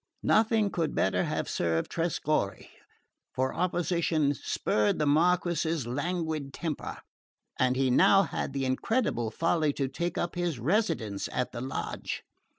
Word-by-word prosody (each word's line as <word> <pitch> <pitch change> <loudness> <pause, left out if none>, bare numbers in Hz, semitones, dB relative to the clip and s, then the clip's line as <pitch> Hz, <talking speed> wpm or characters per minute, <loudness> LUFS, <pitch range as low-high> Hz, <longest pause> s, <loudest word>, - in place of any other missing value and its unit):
"Nothing 220 -2 +3
could 160 -4 -1
better 95 - +2
have - - -2
served 80 -1 -1
Trescorre; 155 - -1 0.7
for 130 +1 0
opposition 170 -4 +1
spurred 105 -6 0
the 150 - +1
Marquess's 165 -1 +2
languid 155 +2 -2
temper, 160 -4 -4 0.6
and 130 0 +3
he 135 +1 +2
had 125 - +2
now 195 +6 +4
the 135 -1 -3
incredible 130 - 0
folly 160 +4 +1
to 135 -1 -1
take 170 +6 -3
up 170 - -1
his 175 -5 -1
residence 120 - 0
in 125 - -1
the 120 - -6
lodge. 130 +1 -4
155 Hz, 135 wpm, -29 LUFS, 130-175 Hz, 0.7 s, now